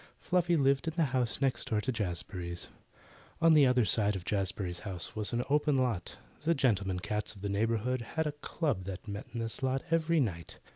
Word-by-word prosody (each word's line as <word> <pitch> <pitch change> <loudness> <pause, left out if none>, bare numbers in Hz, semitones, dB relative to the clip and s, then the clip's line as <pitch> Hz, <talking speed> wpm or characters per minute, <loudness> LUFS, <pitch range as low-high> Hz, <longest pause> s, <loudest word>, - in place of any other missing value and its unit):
Fluffy 175 -1 +2
lived 140 +3 +2
in 160 - -2
the 170 - +3
house 125 0 +1
next 135 -2 +1
door 110 - +2
to 130 +5 -1
Jazbury's. 90 -4 -3 0.7
At 165 -1 +6
the 145 -3 +7
other 125 -2 +3
side 105 +1 +2
of 90 -2 -6
Jazbury's 95 -3 -1
house 95 -5 -5
was 105 -1 -1
an 120 0 0
open 150 0 +2
lot. 120 -9 -1 0.3
The 165 +2 +3
gentlemen 100 -8 +1
cats 105 +3 -2
of 100 - -13
the 100 - -2
neighbourhood 115 +4 0
had 160 0 +1
a 150 - 0
club 145 - -2
that 95 +3 -6
met 100 0 -5
in 120 - -4
this 115 +3 -3
lot 130 0 0
every 165 0 +3
night. 90 - -2
115 Hz, 200 wpm, -31 LUFS, 100-140 Hz, 0.7 s, the